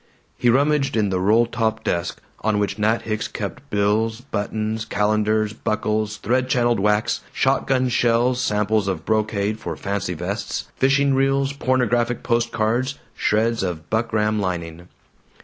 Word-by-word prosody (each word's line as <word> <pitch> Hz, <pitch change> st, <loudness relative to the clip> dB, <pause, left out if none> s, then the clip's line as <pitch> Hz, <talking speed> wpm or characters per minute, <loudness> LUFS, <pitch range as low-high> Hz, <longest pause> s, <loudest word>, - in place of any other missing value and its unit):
He 120 Hz, -, +2 dB
rummaged 140 Hz, 0 st, +2 dB
in 105 Hz, -3 st, +1 dB
the 95 Hz, -, 0 dB
roll 110 Hz, +5 st, +4 dB
top 110 Hz, -1 st, -1 dB
desk 85 Hz, 0 st, -2 dB, 0.2 s
on 110 Hz, -1 st, 0 dB
which 105 Hz, +1 st, -1 dB
Nat 110 Hz, +2 st, +1 dB
Hicks 110 Hz, -1 st, -2 dB
kept -, -, -6 dB
bills, 105 Hz, +2 st, +1 dB
buttons, 110 Hz, -2 st, -3 dB
calendars, 110 Hz, +1 st, +1 dB
buckles, 110 Hz, 0 st, -1 dB
thread 130 Hz, +5 st, 0 dB
channeled 120 Hz, -4 st, +2 dB
wax, 105 Hz, +2 st, +1 dB
shotgun 130 Hz, -1 st, +1 dB
shells, 120 Hz, +1 st, +2 dB
samples 105 Hz, -2 st, +1 dB
of 95 Hz, -4 st, -3 dB
brocade 110 Hz, -1 st, 0 dB
for -, -, -5 dB
"fancy 100 Hz, -3 st, -3 dB
vests," 100 Hz, +5 st, -4 dB
fishing 140 Hz, +1 st, +3 dB
reels, 135 Hz, +1 st, +2 dB
pornographic 125 Hz, -3 st, 0 dB
post 120 Hz, -1 st, +1 dB
cards, 120 Hz, +5 st, 0 dB, 0.2 s
shreds 115 Hz, +2 st, +1 dB
of 85 Hz, -4 st, -4 dB
buckram 110 Hz, -1 st, +1 dB
lining. 85 Hz, -3 st, -4 dB
110 Hz, 140 wpm, -22 LUFS, 105-120 Hz, 0.2 s, roll